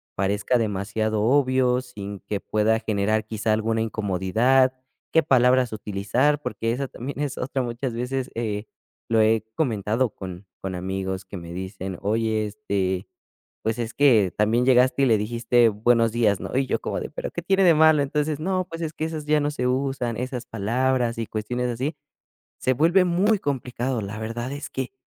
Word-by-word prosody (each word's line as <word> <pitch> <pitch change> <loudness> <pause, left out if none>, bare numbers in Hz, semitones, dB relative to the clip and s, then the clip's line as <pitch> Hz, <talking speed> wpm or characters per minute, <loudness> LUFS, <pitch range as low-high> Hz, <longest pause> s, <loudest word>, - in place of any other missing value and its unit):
parezca 100 +5 +1
demasiado 110 0 -1
obvio, 130 -1 +3
sin 100 -6 -8
que 100 0 -3
pueda 110 +1 +1
generar, 110 0 0
quizá, 110 0 -2
alguna 110 +1 0
incomodidad. 110 +5 +2 0.4
Qué 160 - +4
palabras 125 -2 +3
utilizar, 110 +9 0
porque 115 -5 -2
esa 135 +3 -2
también 135 +3 -7
es 145 -3 -2
otra, 130 0 -1
muchas 120 +1 -3
veces, 125 +2 -2
eh, 110 -2 -2 0.4
lo 115 -1 +4
he 110 0 +3
comentado 115 -2 0
con 95 0 -8 0.2
con 95 -1 -4
amigos 95 +1 -3
que 95 - -8
me 85 -1 -8
dicen: 95 0 -5
"Oye, 110 +1 0
este, 100 -5 -2 0.6
pues, 110 +1 -1
es 115 -1 -3
que 115 -10 +4
también 110 +4 +2
llegaste, 130 +1 +4
y - - +6
le 115 -3 +4
dijiste 120 +2 +3
'Buenos 115 +2 +2
días', 105 -5 +2
¿no?", - - -6
y 135 - +2
yo - - -1
como - - -3
de: - - -5
"Pero - - -4
¿qué 175 - -4
tiene 195 +2 +3
de 170 - +7
malo?". 160 -1 +6
Entonces: 150 +1 -1
"No, 185 +2 -1
pues, 165 0 -6
es 160 -1 -3
que 155 - -5
esas 155 -2 -5
ya 150 0 +3
no 145 - 0
se 125 -4 -1
usan, 130 -3 -1
esas 125 0 -4
palabras 120 +3 0
y 115 - -3
cuestiones 120 +3 -2
así", 130 +7 -2 0.6
se 130 - +1
vuelve 170 +7 +4
muy 195 +5 +2
complicado. 125 - -2
La 100 +2 -6
verdad, 120 +4 -4
es 145 +1 -6
que, 130 -1 -4
120 Hz, 180 wpm, -24 LUFS, 105-135 Hz, 0.6 s, de